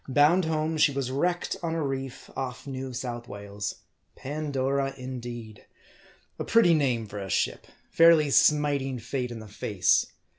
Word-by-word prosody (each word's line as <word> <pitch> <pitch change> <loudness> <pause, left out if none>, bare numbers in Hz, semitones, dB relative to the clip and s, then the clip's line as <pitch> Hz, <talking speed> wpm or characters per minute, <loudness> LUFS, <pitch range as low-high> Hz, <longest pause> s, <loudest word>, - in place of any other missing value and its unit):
Bound 150 +7 +4
home 160 0 -1
she 150 - +5
was 135 -2 -2
wrecked 175 +6 -1
on 165 -1 -2
a 165 - -1
reef 135 -2 -5
off 125 +1 -5
New 130 -1 -5
South 120 -1 -5
Wales. 100 -1 -6 0.3
Pandora, 140 -1 -2
indeed! 120 -4 -7 0.7
A - - -1
pretty 225 -7 +5
name 130 -7 +1
for 105 0 -7
a 95 -1 -6
ship: - - -1 0.2
fairly 165 -3 +6
smiting 140 -3 +3
Fate 125 +2 -3
in 120 - -7
the 110 -1 -9
face. 100 -2 +1
135 Hz, 150 wpm, -27 LUFS, 120-150 Hz, 0.7 s, fairly